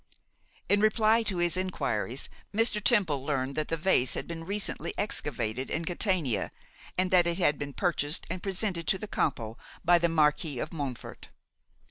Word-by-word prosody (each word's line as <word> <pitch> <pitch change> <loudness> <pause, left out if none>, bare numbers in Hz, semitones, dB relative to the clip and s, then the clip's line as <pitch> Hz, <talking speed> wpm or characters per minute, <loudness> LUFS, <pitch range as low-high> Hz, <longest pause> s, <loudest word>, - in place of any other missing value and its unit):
In 205 - +4
reply 215 +1 +4
to 205 -5 -1
his 175 -1 +1
enquiries, 185 0 -2 0.2
Mr. 215 -1 +1
Temple 180 - +3
learned 135 -2 -1
that 155 +1 -1
the 165 - -1
vase 155 -7 +2
had - - -4
been 165 -1 -6
recently 200 +3 -1
excavated 130 - -2
in 165 +1 -2
Catania, 175 - 0 0.5
and 185 0 +1
that 175 -2 +5
it 170 0 0
had 150 -6 +2
been 145 -1 -4
purchased 165 -3 0
and 185 - -4
presented 190 -4 -2
to 190 - +2
the 215 - -6
Campo 115 - -1 0.3
by 175 0 +6
the 170 0 +2
Marquis 150 -2 +2
of 150 - -4
Montfort. 140 -6 -6
170 Hz, 165 wpm, -29 LUFS, 145-190 Hz, 0.5 s, by